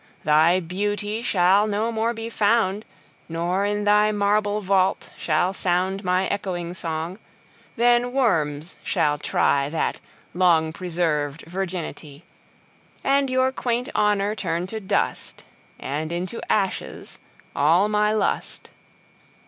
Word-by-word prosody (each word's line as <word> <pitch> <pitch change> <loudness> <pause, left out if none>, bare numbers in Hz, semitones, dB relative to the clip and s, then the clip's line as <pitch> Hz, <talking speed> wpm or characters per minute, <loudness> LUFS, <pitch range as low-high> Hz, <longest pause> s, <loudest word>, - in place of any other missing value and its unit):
Thy 160 +4 +4
Beauty 205 +4 -3
shall 195 -1 +3
no 215 +2 -1
more 225 +1 0
be 225 -1 -6
found; 215 -2 +1 0.4
Nor, 175 +4 -1
in 205 0 -1
thy 210 +1 +4
marble 205 0 +1
Vault, 190 -1 +1
shall 175 +4 0
soundMy 185 0 0
ecchoing 180 -3 -3
Song: 165 +3 -4 0.6
then 240 +1 +3
Worms 165 - 0
shall 150 -1 +1
tryThat 140 +2 0 0.4
long 165 -3 +3
preserv'd 165 -5 -2
Virginity:And 180 - -5
your 260 0 +2
quaint 245 -1 -2
Honour 205 0 +2
turn 170 -4 -2
to 220 +4 -5
dust; 195 - -2 0.4
And 155 +4 -4
into 180 +6 -4
ashes 195 -3 -2 0.4
all 165 +8 +4
my 210 0 +2
Lust. 215 -2 -2
190 Hz, 110 wpm, -23 LUFS, 170-210 Hz, 0.6 s, Thy